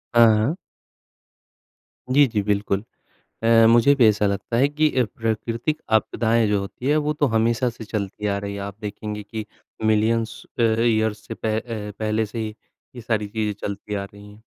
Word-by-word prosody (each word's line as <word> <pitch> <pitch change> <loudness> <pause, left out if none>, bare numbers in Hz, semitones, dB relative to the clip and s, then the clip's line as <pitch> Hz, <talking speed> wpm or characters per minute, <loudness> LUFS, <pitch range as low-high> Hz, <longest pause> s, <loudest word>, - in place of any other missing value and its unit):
हाँ, 115 -2 +7
हाँ। 115 +10 +1 1.6
जी, 145 +2 +6
जी, 110 -4 -1
बिल्कुल। 100 -1 0 0.6
अ, 115 0 +6
मुझे 120 +4 +6
भी 125 -5 +5
ऐसा 105 -1 +3
लगता 100 +4 -2
है 135 +3 +4
कि 150 +1 +2
अ, - - +5
प्राकृतिक 115 +6 -1 0.2
आपदाएँ 115 +1 +1
जो 105 -1 +1
होती 100 +6 -6
हैं, 150 +2 +3
वो 150 0 0
तो 150 0 +1
हमेशा 115 +3 +2
से 115 -1 -10
चलती 105 -1 -4
आ 100 -1 0
रही 100 0 -5
हैं। 100 - -5
आप 100 -1 -6
देखेंगे 105 0 -5
कि 110 +1 -6 0.4
मिलियन्स 110 +1 +1 0.2
अ, - - +3
ईयर्स 110 -1 +1
से - - -4
प - - -9
अ, 110 0 +1 0.4
पहले 110 0 0
से 110 +2 -7
ही 110 -1 -2 0.5
ये 120 - -7
सारी 110 -2 -1
चीज़ें 105 0 -2
चलती 100 +1 -5
आ 100 - -2
रही 100 +1 -12
हैं। 105 - -17
110 Hz, 185 wpm, -23 LUFS, 105-115 Hz, 1.6 s, हाँ